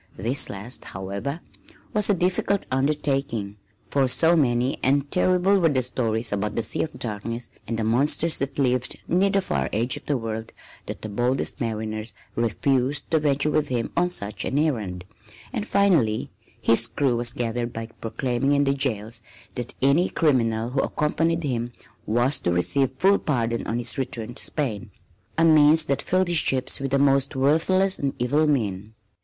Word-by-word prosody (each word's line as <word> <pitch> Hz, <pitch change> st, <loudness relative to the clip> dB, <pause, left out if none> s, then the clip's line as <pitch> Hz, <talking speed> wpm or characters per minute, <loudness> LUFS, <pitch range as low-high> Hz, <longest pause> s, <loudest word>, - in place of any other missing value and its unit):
This 120 Hz, +8 st, +1 dB
last, 105 Hz, +5 st, -6 dB
however, 100 Hz, -, -5 dB, 0.5 s
was 210 Hz, -1 st, +4 dB
a 205 Hz, -, +4 dB
difficult 185 Hz, +2 st, 0 dB
undertaking, 135 Hz, -6 st, -1 dB, 0.3 s
for 135 Hz, -2 st, +2 dB
so 165 Hz, +6 st, +4 dB
many 125 Hz, -3 st, +1 dB
and 140 Hz, +1 st, +1 dB
terrible 185 Hz, +2 st, +3 dB
were 165 Hz, -3 st, +3 dB
the 130 Hz, -3 st, +1 dB
stories 115 Hz, -3 st, -1 dB
about 105 Hz, +1 st, -2 dB
the 115 Hz, -, 0 dB
Sea -, -, -1 dB
of 155 Hz, -, -4 dB
Darkness 115 Hz, 0 st, -4 dB, 0.2 s
and 115 Hz, -, -2 dB
the 115 Hz, -, -1 dB
monsters 140 Hz, +8 st, +2 dB
that 140 Hz, 0 st, -3 dB
lived 125 Hz, -2 st, 0 dB
near 185 Hz, +3 st, +2 dB
the 195 Hz, 0 st, +2 dB
far -, -, -1 dB
edge 120 Hz, +7 st, 0 dB
of 145 Hz, -, -13 dB
the 145 Hz, -, +1 dB
world 110 Hz, -1 st, -5 dB, 0.3 s
that -, -, -7 dB
the -, -, -3 dB
boldest 120 Hz, +7 st, -1 dB
mariners 110 Hz, -1 st, -3 dB, 0.2 s
refused 130 Hz, +5 st, 0 dB
to 160 Hz, -, +4 dB
venture 145 Hz, 0 st, +1 dB
with 150 Hz, 0 st, +1 dB
him 120 Hz, -3 st, -2 dB
on 180 Hz, +1 st, +2 dB
such 105 Hz, -11 st, -2 dB
an 135 Hz, -, -2 dB
errand, 105 Hz, -, -1 dB, 0.5 s
and 220 Hz, -3 st, -3 dB
finally 145 Hz, -, +2 dB, 0.3 s
his 115 Hz, 0 st, +4 dB
crew 135 Hz, -4 st, 0 dB
was 120 Hz, 0 st, +1 dB
gathered 120 Hz, 0 st, -3 dB
by 115 Hz, 0 st, -5 dB
proclaiming 120 Hz, +4 st, -2 dB
in 145 Hz, 0 st, +3 dB
the 135 Hz, -1 st, +2 dB
jails 115 Hz, -4 st, -1 dB, 0.3 s
that 120 Hz, -1 st, -5 dB
any 145 Hz, +7 st, +3 dB
criminal 115 Hz, -6 st, +1 dB
who 135 Hz, +1 st, +1 dB
accompanied 165 Hz, +2 st, 0 dB
him 120 Hz, -3 st, -2 dB, 0.3 s
was 120 Hz, +5 st, +2 dB
to 90 Hz, -, -1 dB
receive 125 Hz, +10 st, +2 dB
full 195 Hz, +9 st, +3 dB
pardon 115 Hz, -5 st, -1 dB
on 115 Hz, -, -1 dB
his 120 Hz, +2 st, +1 dB
return 120 Hz, -3 st, -3 dB
to -, -, -5 dB
Spain 120 Hz, -10 st, -3 dB, 0.5 s
a 165 Hz, -, +4 dB
means 155 Hz, 0 st, +6 dB
that 140 Hz, -2 st, 0 dB
filled 185 Hz, 0 st, +1 dB
his 175 Hz, -1 st, +1 dB
ships 130 Hz, -4 st, +1 dB
with 135 Hz, 0 st, -3 dB
the 140 Hz, -, +2 dB
most 140 Hz, 0 st, +2 dB
worthless 165 Hz, +8 st, +2 dB
and 140 Hz, -1 st, -2 dB
evil 145 Hz, +6 st, +1 dB
men. 110 Hz, -6 st, -1 dB
130 Hz, 175 wpm, -24 LUFS, 115-150 Hz, 0.5 s, means